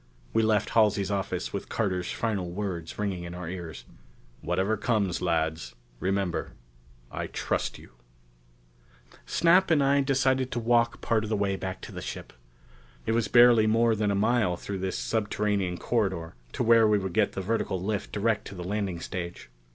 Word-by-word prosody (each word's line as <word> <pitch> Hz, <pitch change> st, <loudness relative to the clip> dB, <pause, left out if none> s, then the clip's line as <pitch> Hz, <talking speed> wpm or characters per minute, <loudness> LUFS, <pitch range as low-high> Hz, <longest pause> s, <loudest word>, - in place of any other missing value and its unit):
We 115 Hz, -, +3 dB
left 110 Hz, -1 st, +1 dB
Halsey's 105 Hz, -3 st, +3 dB
office 100 Hz, -1 st, -2 dB
with -, -, -5 dB
Carter's 90 Hz, -5 st, -1 dB
final 100 Hz, -6 st, -2 dB
words 90 Hz, -3 st, -4 dB
ringing 100 Hz, -4 st, -2 dB
in 85 Hz, 0 st, -7 dB
our 90 Hz, -1 st, -6 dB
ears. 85 Hz, -8 st, -7 dB, 0.6 s
"Whatever 95 Hz, +5 st, 0 dB
comes, 100 Hz, -5 st, 0 dB
lads, 80 Hz, -2 st, -1 dB, 0.2 s
remember 95 Hz, 0 st, -1 dB, 0.6 s
I -, -, -4 dB
trust -, -, -2 dB
you...." -, -, -15 dB, 1.4 s
Snap 180 Hz, +3 st, +4 dB
and 155 Hz, -4 st, +4 dB
I 140 Hz, +1 st, +4 dB
decided 130 Hz, -1 st, +1 dB
to 120 Hz, -, -1 dB
walk 115 Hz, 0 st, +2 dB
part 110 Hz, -2 st, +1 dB
of 110 Hz, -, -4 dB
the 110 Hz, -, 0 dB
way 100 Hz, -1 st, 0 dB
back 95 Hz, -1 st, -5 dB
to -, -, -8 dB
the -, -, -7 dB
ship. -, -, -7 dB, 0.7 s
It -, -, 0 dB
was 115 Hz, -2 st, +1 dB
barely 120 Hz, -2 st, +6 dB
more 115 Hz, +1 st, +3 dB
than 105 Hz, -1 st, 0 dB
a 100 Hz, -, +1 dB
mile 105 Hz, -3 st, +2 dB
through 100 Hz, +2 st, -5 dB
this 95 Hz, 0 st, -2 dB
subterranean 105 Hz, -4 st, -1 dB
corridor 95 Hz, -9 st, -1 dB, 0.2 s
to -, -, -1 dB
where 115 Hz, -1 st, +6 dB
we 105 Hz, -1 st, +4 dB
could 95 Hz, -3 st, -3 dB
get -, -, +2 dB
the 95 Hz, -, -3 dB
vertical 95 Hz, -2 st, -1 dB
lift 100 Hz, +2 st, -3 dB
direct 110 Hz, +1 st, 0 dB
to 100 Hz, -, -9 dB
the 90 Hz, -, -6 dB
landing 95 Hz, -2 st, -2 dB
stage. 85 Hz, -9 st, -6 dB
100 Hz, 175 wpm, -27 LUFS, 90-115 Hz, 1.4 s, barely